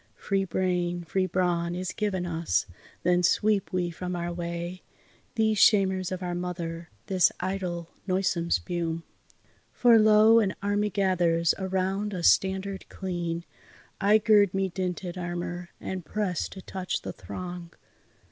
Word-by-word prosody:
Free 195 Hz, -1 st, -1 dB
brain, 175 Hz, -1 st, -1 dB
free 185 Hz, +3 st, 0 dB
brawn, 175 Hz, -1 st, 0 dB
is 185 Hz, 0 st, -3 dB
given 195 Hz, -4 st, -1 dB
us, 165 Hz, -1 st, 0 dB, 0.4 s
then 180 Hz, 0 st, +3 dB
sweep 205 Hz, +3 st, +2 dB
we 180 Hz, -2 st, -1 dB
from 180 Hz, +2 st, -4 dB
our 175 Hz, 0 st, -3 dB
way 170 Hz, +1 st, -5 dB, 0.5 s
These 220 Hz, -2 st, +2 dB
shamers 190 Hz, -3 st, +4 dB
of 185 Hz, 0 st, -4 dB
our 175 Hz, -1 st, -2 dB
mother, 170 Hz, -2 st, -4 dB, 0.2 s
this 185 Hz, -2 st, +3 dB
idle, 180 Hz, -3 st, -3 dB, 0.2 s
noisome 185 Hz, -2 st, 0 dB
spume. 170 Hz, -2 st, -1 dB, 0.7 s
For, 235 Hz, -2 st, +5 dB
lo! 215 Hz, +1 st, +6 dB
an 200 Hz, -4 st, 0 dB
army 205 Hz, +1 st, 0 dB
gathers 175 Hz, -4 st, +2 dB
around 190 Hz, +2 st, -1 dB
a 175 Hz, -, -4 dB
standard 190 Hz, +2 st, +2 dB
clean; 175 Hz, -3 st, -4 dB, 0.6 s
I 205 Hz, +2 st, +6 dB
gird 205 Hz, -3 st, +4 dB
me 195 Hz, 0 st, +1 dB
dinted 180 Hz, 0 st, -4 dB
armour, 175 Hz, 0 st, -4 dB
and 185 Hz, -1 st, -5 dB
press 185 Hz, 0 st, -2 dB
to 190 Hz, -, -10 dB
touch 185 Hz, -1 st, -4 dB
the -, -, -5 dB
throng. 175 Hz, -2 st, -7 dB
185 Hz, 140 wpm, -27 LUFS, 175-195 Hz, 0.7 s, lo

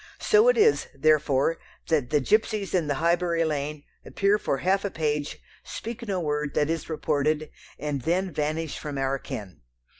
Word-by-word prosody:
So 430 Hz, +2 st, +4 dB
it -, -, +5 dB
is, 440 Hz, 0 st, +4 dB
therefore, 155 Hz, +1 st, +2 dB, 0.3 s
that 150 Hz, -7 st, +1 dB
the 150 Hz, 0 st, +3 dB
gipsies 215 Hz, -, +1 dB
in 175 Hz, -5 st, +1 dB
the 145 Hz, -, 0 dB
Highbury 170 Hz, +1 st, +1 dB
lane 150 Hz, -1 st, -3 dB, 0.2 s
appear 200 Hz, +1 st, +1 dB
for 140 Hz, -, -1 dB
half 190 Hz, +6 st, +1 dB
a 200 Hz, -, -1 dB
page, 150 Hz, -4 st, -2 dB, 0.3 s
speak 235 Hz, +1 st, -7 dB
no 195 Hz, -2 st, -1 dB
word 150 Hz, -3 st, -2 dB
that 150 Hz, +1 st, +2 dB
is 165 Hz, -1 st, -3 dB
reported, 155 Hz, -1 st, 0 dB, 0.3 s
and 145 Hz, -2 st, -3 dB
then 180 Hz, +5 st, 0 dB
vanish 155 Hz, +1 st, -2 dB
from 145 Hz, -2 st, -5 dB
our 135 Hz, 0 st, 0 dB
ken. 95 Hz, -, -8 dB
155 Hz, 170 wpm, -26 LUFS, 145-185 Hz, 0.3 s, it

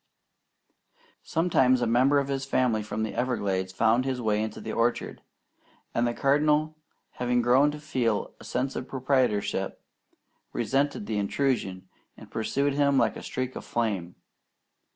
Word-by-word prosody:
Sometimes 145 Hz, -7 st, +2 dB
a 120 Hz, -, +1 dB
member 130 Hz, +5 st, +4 dB
of 140 Hz, -1 st, +1 dB
his 135 Hz, -1 st, -2 dB
family 125 Hz, -5 st, +1 dB
from 105 Hz, +1 st, -3 dB
the 110 Hz, -, -3 dB
Everglades 100 Hz, -7 st, -1 dB
found 115 Hz, +6 st, +3 dB
his 130 Hz, -1 st, -2 dB
way 105 Hz, -2 st, +1 dB
into 110 Hz, -1 st, -4 dB
the -, -, -5 dB
orchard, 115 Hz, +1 st, -1 dB, 0.7 s
and 120 Hz, +1 st, +1 dB
the 120 Hz, -, -1 dB
Cardinal, 150 Hz, +2 st, +2 dB, 0.4 s
having 125 Hz, 0 st, 0 dB
grown 130 Hz, +4 st, +5 dB
to 150 Hz, 0 st, -6 dB
feel 125 Hz, -8 st, -1 dB
a -, -, -12 dB
sense 130 Hz, +2 st, -2 dB
of 130 Hz, -, -4 dB
proprietorship, 125 Hz, -7 st, 0 dB, 0.7 s
resented 135 Hz, 0 st, 0 dB
the 105 Hz, -1 st, -1 dB
intrusion 100 Hz, -5 st, -1 dB, 0.3 s
and -, -, -14 dB
pursued 140 Hz, +5 st, 0 dB
him 140 Hz, -1 st, +3 dB
like -, -, +2 dB
a -, -, -7 dB
streak 130 Hz, 0 st, -4 dB
of -, -, -6 dB
flame. 100 Hz, -7 st, -2 dB
125 Hz, 150 wpm, -27 LUFS, 110-140 Hz, 0.7 s, grown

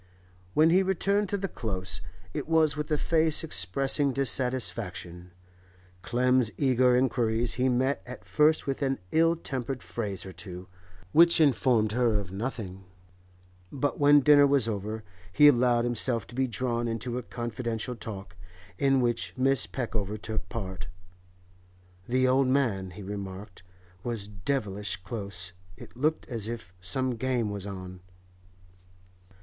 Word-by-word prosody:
When 155 Hz, +2 st, +5 dB
he 185 Hz, +3 st, +5 dB
returned 195 Hz, +2 st, +1 dB
to 200 Hz, -, 0 dB
the 195 Hz, 0 st, -2 dB
Close, 95 Hz, -, -4 dB, 0.3 s
it -, -, -4 dB
was 160 Hz, -2 st, +3 dB
with 150 Hz, 0 st, -4 dB
a 150 Hz, -, +1 dB
face 160 Hz, 0 st, +3 dB
expressing 135 Hz, -, +2 dB
dissatisfaction. 115 Hz, -9 st, -1 dB, 0.7 s
Clem's 125 Hz, +3 st, +2 dB
eager 130 Hz, -2 st, +3 dB
inquiries 120 Hz, -2 st, +1 dB
he 130 Hz, +1 st, +1 dB
met 130 Hz, +3 st, +1 dB
at 125 Hz, -, -9 dB
first 155 Hz, +1 st, +3 dB
with 135 Hz, 0 st, -3 dB
an 135 Hz, -1 st, 0 dB
ill 165 Hz, +1 st, +4 dB
tempered 135 Hz, -5 st, -4 dB
phrase 100 Hz, -6 st, -4 dB
or 95 Hz, -, -8 dB
two, 90 Hz, -1 st, -8 dB, 0.4 s
which 170 Hz, +1 st, +6 dB
informed 125 Hz, -7 st, +3 dB
her 120 Hz, -1 st, +2 dB
of 100 Hz, -4 st, -2 dB
nothing; 95 Hz, -3 st, -5 dB, 0.9 s
but 145 Hz, +1 st, -2 dB
when 145 Hz, 0 st, +6 dB
dinner 145 Hz, 0 st, +6 dB
was 140 Hz, -5 st, +3 dB
over 110 Hz, +1 st, -4 dB, 0.3 s
he 145 Hz, +10 st, +6 dB
allowed 120 Hz, -3 st, +4 dB
himself 120 Hz, -1 st, +1 dB
to -, -, -13 dB
be 130 Hz, +1 st, 0 dB
drawn 120 Hz, 0 st, -1 dB
into 120 Hz, +2 st, -3 dB
a -, -, -5 dB
confidential 120 Hz, 0 st, -4 dB
talk, 100 Hz, -5 st, -8 dB, 0.4 s
in 135 Hz, -2 st, +3 dB
which 120 Hz, -1 st, -1 dB
Mrs. 135 Hz, +1 st, +2 dB
Peckover 110 Hz, -5 st, -3 dB
took 110 Hz, +1 st, -5 dB
part. 95 Hz, -7 st, -5 dB, 1.2 s
The 130 Hz, +1 st, +2 dB
old 130 Hz, +1 st, +3 dB
man, 120 Hz, -9 st, +1 dB
he 90 Hz, +3 st, -10 dB
remarked, 100 Hz, -1 st, -7 dB, 0.4 s
was 115 Hz, -4 st, -3 dB
devilish 105 Hz, -1 st, -2 dB
close; 95 Hz, -4 st, -4 dB, 0.2 s
it -, -, -13 dB
looked 155 Hz, +5 st, -1 dB
as 115 Hz, -4 st, -3 dB
if 110 Hz, -7 st, -7 dB
'some 125 Hz, +7 st, 0 dB
game 120 Hz, -3 st, -1 dB
was 100 Hz, -1 st, -5 dB
on. 95 Hz, -2 st, -8 dB
120 Hz, 140 wpm, -28 LUFS, 100-135 Hz, 1.2 s, which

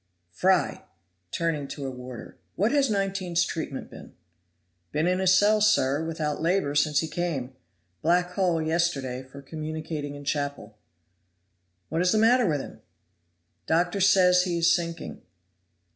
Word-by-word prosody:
Fry" 180 Hz, -, +1 dB, 0.4 s
(turning 155 Hz, -, -2 dB
to 140 Hz, 0 st, -6 dB
a 135 Hz, -, -3 dB
warder), 125 Hz, -1 st, -9 dB, 0.2 s
"what 210 Hz, +4 st, +1 dB
has 280 Hz, -2 st, +2 dB
19's 195 Hz, -4 st, 0 dB
treatment 155 Hz, -6 st, -5 dB
been?" -, -, -12 dB, 0.8 s
"Been 155 Hz, -, 0 dB
in 180 Hz, +1 st, +1 dB
his 190 Hz, 0 st, +4 dB
cell, 210 Hz, +1 st, +4 dB
sir, 160 Hz, -9 st, +3 dB
without 155 Hz, -2 st, -3 dB
labor 170 Hz, -3 st, +1 dB
since 145 Hz, 0 st, +2 dB
he 160 Hz, -, -3 dB
came. 155 Hz, -7 st, -3 dB, 0.5 s
Blackhole 180 Hz, 0 st, +1 dB
yesterday, 155 Hz, -6 st, -1 dB
for 135 Hz, +2 st, -13 dB
communicating 155 Hz, -1 st, -5 dB
in 145 Hz, -, -9 dB
chapel." 140 Hz, -7 st, -3 dB, 1.1 s
"What 160 Hz, +2 st, 0 dB
is 180 Hz, 0 st, +3 dB
the 220 Hz, -, +2 dB
matter 235 Hz, +1 st, +4 dB
with 150 Hz, -4 st, 0 dB
him?" -, -, -11 dB, 0.9 s
"Doctor 175 Hz, +4 st, +1 dB
says 185 Hz, -2 st, +5 dB
he 180 Hz, -2 st, -1 dB
is 170 Hz, -1 st, +4 dB
sinking." 170 Hz, -1 st, -5 dB
165 Hz, 140 wpm, -26 LUFS, 145-185 Hz, 1.1 s, says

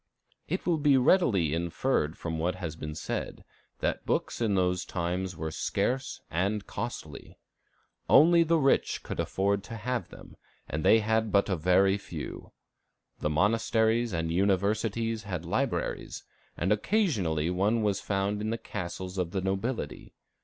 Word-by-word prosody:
It 185 Hz, +5 st, -2 dB
will 170 Hz, -3 st, +2 dB
be 145 Hz, -2 st, +5 dB
readily 120 Hz, -, +3 dB
inferred 85 Hz, -, 0 dB
from 80 Hz, -1 st, -4 dB
what 90 Hz, +3 st, 0 dB
has 85 Hz, -4 st, -5 dB
been 75 Hz, -1 st, -6 dB
said -, -, -4 dB, 0.4 s
that -, -, -1 dB
books -, -, -1 dB
in 105 Hz, -4 st, +2 dB
those 90 Hz, -1 st, +1 dB
times 90 Hz, 0 st, -3 dB
were 80 Hz, 0 st, -3 dB
scarce 125 Hz, +11 st, -1 dB
and 100 Hz, +5 st, 0 dB
costly. -, -, -6 dB, 0.7 s
Only 170 Hz, +2 st, +7 dB
the 165 Hz, 0 st, +3 dB
rich 135 Hz, -3 st, +2 dB
could -, -, -6 dB
afford 100 Hz, +1 st, 0 dB
to 115 Hz, -, -7 dB
have 120 Hz, +2 st, -3 dB
them, -, -, -13 dB, 0.3 s
and 75 Hz, 0 st, -3 dB
they 110 Hz, -, +6 dB
had 110 Hz, 0 st, +1 dB
but 100 Hz, 0 st, +3 dB
very 95 Hz, +3 st, +3 dB
few. -, -, -7 dB, 0.7 s
The 75 Hz, -, -1 dB
monasteries 110 Hz, +6 st, +2 dB
and 80 Hz, -2 st, -1 dB
universities 105 Hz, +4 st, +1 dB
had 90 Hz, -4 st, -4 dB
libraries, 85 Hz, -, -2 dB, 0.3 s
and 90 Hz, -, 0 dB
occasionally 105 Hz, -, +1 dB
one 105 Hz, +5 st, +1 dB
was 100 Hz, -2 st, 0 dB
found 100 Hz, +1 st, -1 dB
in 110 Hz, -, -2 dB
the 115 Hz, -, -1 dB
castles 90 Hz, -1 st, -5 dB
of 90 Hz, -2 st, 0 dB
the 95 Hz, +2 st, -2 dB
nobility. 95 Hz, -, -3 dB
100 Hz, 145 wpm, -29 LUFS, 90-115 Hz, 0.7 s, Only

